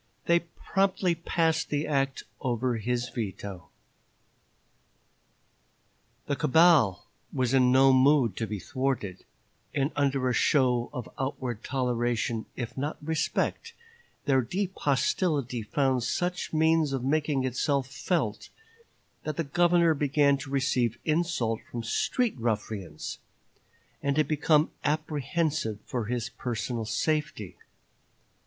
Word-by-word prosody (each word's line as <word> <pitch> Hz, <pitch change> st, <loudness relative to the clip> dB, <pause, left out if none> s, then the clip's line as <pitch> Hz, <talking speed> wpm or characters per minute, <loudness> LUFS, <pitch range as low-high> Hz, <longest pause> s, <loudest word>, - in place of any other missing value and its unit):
They 170 Hz, 0 st, +4 dB
promptly 185 Hz, +2 st, 0 dB
passed 165 Hz, -1 st, 0 dB
the 145 Hz, +1 st, 0 dB
act 135 Hz, -2 st, 0 dB, 0.2 s
over 125 Hz, -1 st, 0 dB
his 120 Hz, +2 st, -2 dB
veto. 100 Hz, -5 st, -6 dB, 2.6 s
The 140 Hz, -, -1 dB
cabal 145 Hz, -, +4 dB, 0.3 s
was 130 Hz, -1 st, 0 dB
in 125 Hz, -2 st, +5 dB
no 135 Hz, +1 st, +6 dB
mood 130 Hz, -5 st, +4 dB
to 110 Hz, -, -2 dB
be 105 Hz, 0 st, -3 dB
thwarted, 130 Hz, -7 st, -2 dB, 0.5 s
and 140 Hz, +1 st, +1 dB
under 140 Hz, -2 st, +1 dB
a 125 Hz, -, +1 dB
show 125 Hz, -3 st, +2 dB
of 125 Hz, -5 st, -6 dB
outward 130 Hz, -4 st, -3 dB
toleration, 120 Hz, -3 st, -1 dB
if 120 Hz, -3 st, -5 dB
not 145 Hz, +3 st, -3 dB
respect, 160 Hz, -, -2 dB, 0.5 s
their 135 Hz, -2 st, +4 dB
deep 185 Hz, -, -2 dB
hostility 140 Hz, -3 st, 0 dB
found 130 Hz, +3 st, +1 dB
such 175 Hz, +9 st, -2 dB
means 160 Hz, -2 st, +3 dB
of 130 Hz, -2 st, -2 dB
making 145 Hz, -1 st, +1 dB
itself 130 Hz, +2 st, 0 dB
felt 135 Hz, -, -2 dB, 0.7 s
that 155 Hz, -2 st, -4 dB
the 165 Hz, -, +1 dB
Governor 170 Hz, +2 st, +3 dB
began 145 Hz, -1 st, +3 dB
to 135 Hz, -, -7 dB
receive 130 Hz, -4 st, +1 dB
insult 155 Hz, -9 st, 0 dB
from 120 Hz, -1 st, -5 dB
street 235 Hz, -, 0 dB
ruffians, 105 Hz, -6 st, -3 dB, 0.8 s
and 140 Hz, -1 st, 0 dB
to 155 Hz, -, +4 dB
become 155 Hz, 0 st, +2 dB
apprehensive 155 Hz, -, -1 dB
for 120 Hz, -4 st, -3 dB
his 120 Hz, +1 st, -2 dB
personal 120 Hz, -2 st, -3 dB
safety. 145 Hz, -, -1 dB
135 Hz, 115 wpm, -28 LUFS, 120-155 Hz, 2.6 s, no